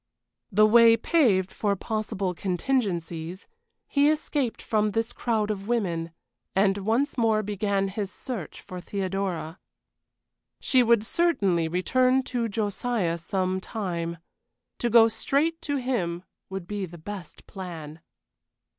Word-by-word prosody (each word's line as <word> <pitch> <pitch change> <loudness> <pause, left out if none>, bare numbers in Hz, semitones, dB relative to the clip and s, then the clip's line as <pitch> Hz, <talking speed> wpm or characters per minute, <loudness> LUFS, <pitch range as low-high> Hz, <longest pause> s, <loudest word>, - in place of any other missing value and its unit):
The 215 +2 +6
way 230 +1 +7
paved 215 - +2
for 205 -2 0
possible 210 -2 -2
contingencies, 180 -4 -2 0.4
he 285 +1 +3
escaped 295 -5 -1
from 215 -1 +1
this 225 +1 -1
crowd 215 -3 0
of 200 -1 -5
women, 175 -9 0 0.5
and 195 +1 +3
once 230 +7 0
more 220 -2 +3
began 200 -1 0
his 195 0 -4
search 235 - -6
for 180 -1 -8
Theodora. 190 -3 -3 1.0
She 255 - +3
would 230 -2 +4
certainly 200 - +2
return 255 +10 +2
to 240 -3 -2
Josiah 205 -4 -1
some 185 +2 -1
time. 170 -5 -3 0.6
To 240 - 0
go 230 0 +7
straight 295 +8 0
to 285 -3 -2
him 185 -10 -2 0.3
would 190 -2 -5
be 200 0 -4
the 175 +1 -11
best 185 +2 -9
plan. 165 -5 -8
205 Hz, 125 wpm, -26 LUFS, 185-235 Hz, 1.0 s, way